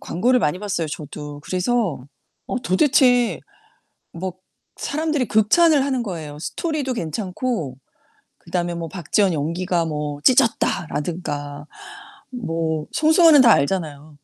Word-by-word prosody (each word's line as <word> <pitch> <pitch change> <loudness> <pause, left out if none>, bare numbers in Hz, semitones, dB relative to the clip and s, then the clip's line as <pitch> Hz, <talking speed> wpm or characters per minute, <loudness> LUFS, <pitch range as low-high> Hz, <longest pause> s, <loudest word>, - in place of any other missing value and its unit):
광고를 245 +9 +1
많이 175 -3 0
봤어요, 200 -5 -2
저도. 150 -1 -7
그래서 185 - -1 0.4
어 255 - -2
도대체 245 +3 +3 0.7
뭐 185 +2 -5 0.4
사람들이 305 -2 -1
극찬을 270 - +4
하는거에요. 180 - -4
스토리도 290 - -3
괜찮고 185 - -3 0.6
그다음에 175 0 -3
뭐 170 -1 -4
"박지원 185 +3 0
연기가 170 +3 -1
뭐 150 -2 -4
찢었다."라든가 155 - 0 0.7
뭐 165 -9 -2
송승헌은 315 -1 +6
다 240 -3 +7
알잖아요. 150 -2 -2
185 Hz, 275 characters per minute, -21 LUFS, 155-245 Hz, 0.7 s, 다